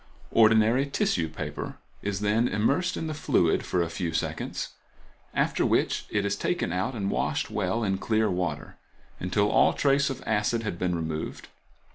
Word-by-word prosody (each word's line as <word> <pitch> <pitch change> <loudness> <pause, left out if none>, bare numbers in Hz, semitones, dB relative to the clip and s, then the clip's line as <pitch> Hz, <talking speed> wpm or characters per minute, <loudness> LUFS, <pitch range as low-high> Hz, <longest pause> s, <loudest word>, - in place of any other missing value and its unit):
Ordinary 115 +4 +5
tissue 85 - 0
paper 75 - -6 0.2
is 100 -1 -2
then 105 +4 +2
immersed 115 - +1
in - - -3
the 155 - -3
fluid 85 - +2
for 90 - 0
a 85 - -3
few 85 -1 -3
seconds, 80 - -3 0.6
after - - +1
which - - +1
it 100 -1 0
is 100 0 0
taken 100 - -1
out 110 +8 -1
and 100 -3 -1
washed - - -1
well 105 +2 0
in 95 -2 0
clear 110 0 +1
water, 90 -2 -3 0.4
until 100 +3 +1
all - - +5
trace 140 0 +2
of 135 -1 -5
acid 110 +2 +1
has 105 - -2
been 90 +1 -1
removed. 80 -2 -4
105 Hz, 165 wpm, -27 LUFS, 90-115 Hz, 0.6 s, Ordinary